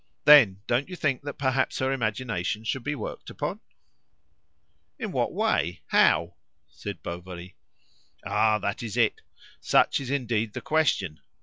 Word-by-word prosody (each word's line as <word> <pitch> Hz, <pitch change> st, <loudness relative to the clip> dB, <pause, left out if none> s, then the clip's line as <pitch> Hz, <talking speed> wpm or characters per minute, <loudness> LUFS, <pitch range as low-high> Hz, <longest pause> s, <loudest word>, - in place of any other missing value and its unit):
Then, 115 Hz, -11 st, +7 dB
don't 125 Hz, +7 st, 0 dB
you 180 Hz, -, -6 dB
think 145 Hz, -7 st, 0 dB
that 145 Hz, 0 st, -6 dB
perhaps 130 Hz, -1 st, 0 dB
her 130 Hz, 0 st, 0 dB
imagination 110 Hz, -4 st, -2 dB
should 120 Hz, +2 st, -3 dB
be 150 Hz, +3 st, -2 dB
worked 115 Hz, -, -7 dB
upon?" -, -, -4 dB, 1.4 s
"In -, -, -4 dB
what -, -, 0 dB
way? 85 Hz, +1 st, 0 dB
How?" 85 Hz, +3 st, +3 dB, 0.3 s
said -, -, -8 dB
Bovary. 90 Hz, +1 st, -8 dB, 0.7 s
"Ah! 110 Hz, 0 st, +2 dB
that 100 Hz, -1 st, -3 dB
is 115 Hz, -1 st, -5 dB
it. 115 Hz, -3 st, +2 dB, 0.4 s
Such -, -, +3 dB
is 135 Hz, -2 st, -6 dB
indeed 115 Hz, -6 st, -1 dB
the -, -, -4 dB
question. 125 Hz, -, 0 dB
115 Hz, 140 wpm, -26 LUFS, 95-135 Hz, 1.4 s, Then